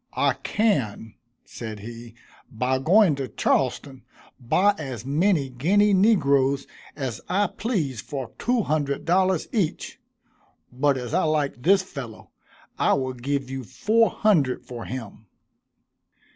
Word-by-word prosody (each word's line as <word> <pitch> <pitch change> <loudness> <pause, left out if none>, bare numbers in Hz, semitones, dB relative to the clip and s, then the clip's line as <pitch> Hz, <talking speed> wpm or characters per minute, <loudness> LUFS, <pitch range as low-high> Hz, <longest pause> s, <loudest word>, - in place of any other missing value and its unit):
"I - - +3
can," 130 - -1 0.3
said 110 -3 -8
he, 115 +1 -10 0.4
"by 125 +3 0
going 180 +4 +5
to 135 -2 -3
Charleston, 130 +3 -1 0.4
buy 185 +12 +3
as 130 -6 -6
many 150 -1 +1
Guinea 200 +11 +3
negroes 140 -10 +3 0.3
as 130 -6 -4
I 200 +3 +2
please 170 - -2
for 135 -5 -6
two 240 -1 +1
hundred 145 -3 -1
dollars 185 0 +2
each, 200 -9 -2 0.7
but 140 +2 +2
as 125 -2 -6
I - - +2
like 150 -5 -1
this 190 +6 +4
fellow, 130 - -9 0.5
I - - +3
will 130 -1 -1
give 135 +1 -3
you 135 -1 -4
four 220 - +2
hundred 145 - +1
for 120 -2 -7
him." 115 -4 -8
140 Hz, 130 wpm, -24 LUFS, 125-185 Hz, 0.7 s, going